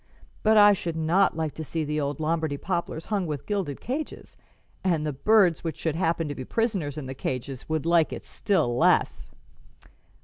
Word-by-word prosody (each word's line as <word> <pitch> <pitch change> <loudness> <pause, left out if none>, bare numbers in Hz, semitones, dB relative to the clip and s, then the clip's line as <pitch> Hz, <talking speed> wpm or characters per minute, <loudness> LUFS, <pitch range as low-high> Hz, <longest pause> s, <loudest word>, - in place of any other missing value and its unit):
But 220 0 +4
I 205 0 +8
should 170 -4 -3
not 165 +4 +2
like 160 -2 -2
to 160 - -6
see 160 +2 -3
the 150 0 -1
old 140 0 -3
Lombardy 160 -2 -1
poplars 170 -1 -3
hung 195 -4 0
with 145 -3 -4
gilded 190 -10 -2
cages, 280 +6 -5 0.5
and 165 -5 +1
the 150 - -2
birds 190 +3 +3
which 165 -2 -3
should 160 - -1
happen 165 -2 0
to 145 - -3
be 130 - -6
prisoners 190 - -1
in 150 - -5
the 130 - -5
cages 130 +1 -5
would 155 -1 -1
like 170 -1 +3
it - - -6
still 160 - 0
less." 125 - +2
160 Hz, 190 wpm, -26 LUFS, 145-190 Hz, 0.5 s, I